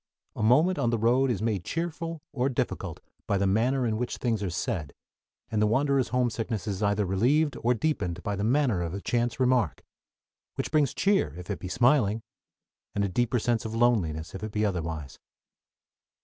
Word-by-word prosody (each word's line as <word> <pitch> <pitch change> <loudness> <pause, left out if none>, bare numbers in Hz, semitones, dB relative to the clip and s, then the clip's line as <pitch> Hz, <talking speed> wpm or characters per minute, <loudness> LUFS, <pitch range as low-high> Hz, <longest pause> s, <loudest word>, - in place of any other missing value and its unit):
A - - -4
moment 155 +12 +4
on 120 - +2
the 115 - +1
road 125 +4 +3
is 110 -4 -1
made 105 -6 0
cheerful 165 - -4
or 130 -1 +1
difficult 125 - -3 0.3
by 100 - +2
the 100 - +1
manner 120 +7 +2
in 110 -2 0
which 125 +1 -3
things 115 -4 -1
are 100 - -1
said, 80 -3 -3 0.6
and 110 -1 +1
the 105 - +4
wanderer's 135 +3 +2
homesickness 115 -3 -1
is 100 -2 -3
either 100 0 +2
relieved 130 - +2
or 120 +1 +2
deepened 100 - -1
by 105 - -1
the 100 - -3
manner 120 -5 +2
of 85 +1 -3
a - - -3
chance 120 +2 -1
remark, 125 - +2 0.7
which - - -3
brings 150 -3 +2
cheer 195 - +2
if 90 0 -6
it - - -3
be 95 - -6
smiling, 115 0 +2 0.7
and 100 - +1
a - - +1
deeper 120 +5 +1
sense 120 0 0
of 110 0 -5
loneliness 90 -10 +1
if 95 - -6
it 110 0 -4
be 105 0 0
otherwise. 80 -7 -3
115 Hz, 190 wpm, -27 LUFS, 100-125 Hz, 0.7 s, moment